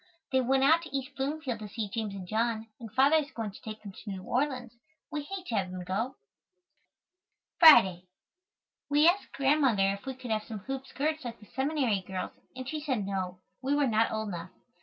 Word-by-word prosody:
They 260 -1 +4
went 265 +2 +2
out 320 +4 +6
to 275 -5 -3
East 270 +1 -6
Bloomfield 270 -3 -2
to 215 - -6
see 215 0 -3
James 210 0 -3
and 185 -2 -7
John, 225 +1 0
and 225 -4 -8
father 275 +7 +5
is 300 -2 -1
going 225 -5 -4
to 195 - -13
take 215 0 -8
them 200 - -7
to 205 - -10
New 190 -2 -5
Orleans. 250 -1 -1 0.4
We 300 -1 -2
hate 370 +5 -6
to 235 - -3
have 190 -2 0
them 180 0 -6
go. 220 +9 -2 1.4
Friday. 190 - +8 0.8
We 295 +2 +5
asked 370 +4 +2
Grandmother 265 -8 +3
if 200 +5 -9
we 265 - -3
could 250 -2 -7
have 215 -1 0
some 220 - -6
hoop 270 +4 -5
skirts 310 +2 -2
like 235 -2 -6
the 210 - -15
seminary 265 - 0
girls 190 -1 -4 0.2
and 255 -1 -6
she 310 +3 -3
said 260 -9 -1
no, 185 -2 -3 0.2
we 275 +2 +1
were 290 -1 +3
not 225 -2 +3
old 220 -1 -2
enough. 175 -1 -5
240 Hz, 205 wpm, -30 LUFS, 205-280 Hz, 1.4 s, Friday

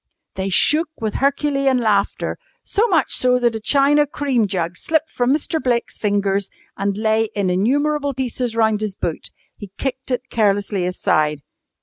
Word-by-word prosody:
They 190 0 -3
shook 305 - +3
with 220 -2 -2
herculean 275 -1 +1
laughter, 210 -4 0 0.2
so 435 +3 +1
much 330 - +1
so 250 0 +4
that 240 -2 +1
a 225 - -3
china 285 +5 +3
cream 270 -6 0
jug 175 -3 -2
slipped 315 +6 -1
from 245 +1 0
Mr. 310 +2 0
Blake's 240 -2 -1
fingers 200 -1 0 0.3
and 200 0 -2
lay 220 0 +1
in 195 -3 0
innumerable 285 +8 0
pieces 250 -2 -2
round 220 -2 +2
his 210 -3 -3
boot. 165 - -4 0.3
He 205 - -9
kicked 265 0 -4
it 250 0 -1
carelessly 200 -3 +1
aside. 150 -4 0
230 Hz, 155 wpm, -20 LUFS, 200-275 Hz, 0.3 s, so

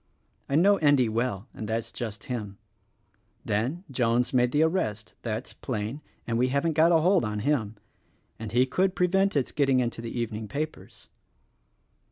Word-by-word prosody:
I 140 - +1
know 200 +6 +5
Endy 145 -6 +4
well, 115 -2 -2
and 110 - -6
that's 115 +1 -2
just 110 -3 -6
him. 110 -7 -5 0.9
Then, 120 - -1
Jones 120 -1 +1
made 125 -1 +3
the 150 +3 +3
arrest 115 - -1
— - - -45
that's 115 +1 -4
plain 115 +3 -4
— - - -38
and 115 -1 -1
we 125 - +3
haven't 145 +4 0
a 165 +1 +6
hold 185 +3 +4
on 105 -1 -2
him 115 -5 0 0.3
— - - -41
and 110 -2 -6
he 125 +3 +4
could 185 +9 0
pre 180 - +3
vent 195 -1 +2
its 135 - 0
getting 135 -3 +2
into 120 -2 -2
the 115 - -5
evening 110 -2 -3
papers. 155 +6 -6
125 Hz, 180 wpm, -27 LUFS, 110-150 Hz, 0.9 s, a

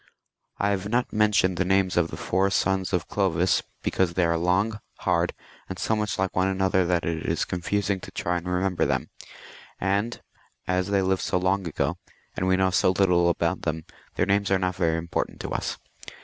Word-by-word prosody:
I 100 - +1
have 100 0 -2
not 120 +2 0
mentioned 105 -4 +3
the 90 - +2
names 95 0 +2
of 85 -1 +2
the - - -7
four 95 +1 +1
sons 95 -1 0
of 90 -2 -1
Glovis, 90 -2 +1 0.2
because 90 -3 0
they 90 - +3
are 85 0 +2
long, 95 +6 +1 0.2
hard, - - +1 0.4
and 95 - -5
so 110 - 0
much 105 -1 -2
like 95 0 -1
one 95 +1 +2
another, 95 -1 +1
that 90 -1 +1
it 80 -1 -2
is 80 - 0
confusing 100 +2 -1
to - - -9
try 90 0 -1
to 90 +1 -7
remember 90 0 0
them; - - -1 0.7
and 100 +5 0 0.5
as 90 0 +1
they 100 -1 +2
lived 95 0 +1
so - - 0
long 95 +1 0
ago, 80 - -2 0.4
and 90 - -1
we 95 0 +3
know 95 0 +2
so 90 - +3
little 90 -2 +3
about 85 -1 0
them, 80 0 -3 0.3
their - - +2
names 100 0 +1
are 95 - +4
not 90 -1 -1
very 85 -3 +1
important 85 +1 -3
to - - -5
us. - - -2
95 Hz, 200 wpm, -25 LUFS, 90-100 Hz, 0.7 s, are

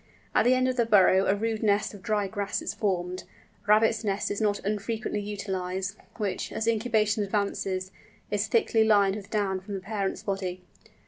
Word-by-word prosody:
At - - +3
the 250 +1 +5
end 255 0 +2
of 255 0 -1
the 235 - +3
burrow 195 -2 +5
a 195 - +3
rude 220 +1 -2
nest 210 -1 +1
of 205 - -11
dry 210 -1 0
grass 200 +1 -2
is - - -4
formed—a 185 +2 -4
rabbit's 220 +2 +4
nest 200 -1 -1
is 205 - -2
not 205 -1 +2
unfrequently 210 +1 -2
utilised—which, 195 0 -4
as 225 - -2
incubation 220 -2 +2
advances, 195 -2 -2 0.4
is 205 +1 0
thickly 225 -1 +3
lined 200 -3 +4
with 205 -1 -8
down 200 -3 0
from 200 +2 -7
the - - -3
parent's 195 0 -3
body. 185 -2 -3
205 Hz, 175 wpm, -27 LUFS, 195-220 Hz, 0.4 s, the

